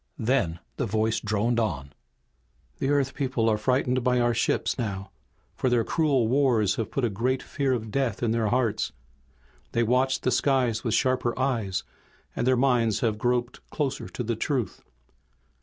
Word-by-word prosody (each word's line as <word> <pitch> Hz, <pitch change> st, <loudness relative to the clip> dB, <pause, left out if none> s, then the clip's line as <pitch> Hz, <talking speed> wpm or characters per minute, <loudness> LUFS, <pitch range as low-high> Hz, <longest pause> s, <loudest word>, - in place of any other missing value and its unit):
Then 115 Hz, -9 st, +1 dB, 0.2 s
the 130 Hz, -, -1 dB
voice 110 Hz, +1 st, +1 dB
droned 110 Hz, +3 st, 0 dB
on. 75 Hz, -, -2 dB, 0.9 s
"The 135 Hz, -, 0 dB
Earth 140 Hz, -2 st, +1 dB
people 130 Hz, -5 st, 0 dB
are 110 Hz, -, +2 dB
frightened 125 Hz, +1 st, +1 dB
by 125 Hz, 0 st, +2 dB
our 120 Hz, 0 st, +2 dB
ships 120 Hz, -, 0 dB
now, 100 Hz, -4 st, -4 dB, 0.4 s
for 130 Hz, -, 0 dB
their 120 Hz, -2 st, +3 dB
cruel 140 Hz, -5 st, +1 dB
wars 120 Hz, -6 st, +2 dB
have 115 Hz, -, -2 dB
put 135 Hz, -, -1 dB
a -, -, +1 dB
great 125 Hz, +6 st, -1 dB
fear 140 Hz, -3 st, -1 dB
of 110 Hz, -3 st, -3 dB
death 130 Hz, -5 st, -1 dB
in 115 Hz, -, +2 dB
their 115 Hz, -1 st, +1 dB
hearts. 120 Hz, -1 st, 0 dB, 0.8 s
They 120 Hz, -, +2 dB
watch 130 Hz, +3 st, +2 dB
the 130 Hz, -, +1 dB
skies 125 Hz, -6 st, +1 dB
with 115 Hz, -, +1 dB
sharper 130 Hz, -2 st, +1 dB
eyes, 120 Hz, -8 st, -1 dB, 0.5 s
and 120 Hz, -, -1 dB
their 130 Hz, -1 st, +4 dB
minds 120 Hz, -5 st, +2 dB
have 110 Hz, -3 st, 0 dB
groped 120 Hz, +1 st, 0 dB
closer 145 Hz, -4 st, -3 dB
to 125 Hz, -, -4 dB
the 115 Hz, 0 st, -1 dB
truth. 120 Hz, -, -2 dB
120 Hz, 170 wpm, -26 LUFS, 110-130 Hz, 0.9 s, their